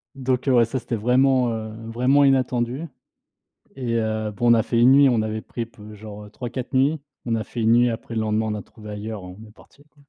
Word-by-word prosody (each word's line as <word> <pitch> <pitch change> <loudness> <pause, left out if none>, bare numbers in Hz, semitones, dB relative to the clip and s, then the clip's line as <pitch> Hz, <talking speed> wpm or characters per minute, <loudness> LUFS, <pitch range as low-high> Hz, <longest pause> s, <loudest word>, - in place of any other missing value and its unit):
Donc 130 0 -1
heu, 130 - +4
ouais 120 -2 +5
ça 130 +4 -4
c'était 120 - -4
vraiment, 125 +2 +3
heu, 110 -1 -5 0.2
vraiment 130 +4 +3
inattendu 130 0 +1 0.9
et 125 -3 -3
heu, 110 -1 -2
bon 120 +3 +2
on - - +8
a 110 - +2
fait 115 - 0
1 125 +2 +6
nuit, 140 0 +7
on 115 -3 +2
avait 110 0 -3
pris 115 -1 -6 0.2
genre, 105 0 -10
heu, - - -13
3-4 125 +1 -6
nuits, 140 +4 +2 0.3
on 115 -1 0
a 110 - -2
fait 120 - -6
1 110 +1 +4
nuit 120 0 +4
après 115 0 -7
le 110 - 0
lendemain 110 0 0
on 105 - -2
a 105 - -6
trouvé 105 -2 -13
ailleurs, 105 0 -6
on 90 +1 -10
est - - -16
parti, 140 +5 -21
quoi. 150 - -38
120 Hz, 240 wpm, -23 LUFS, 110-130 Hz, 0.9 s, on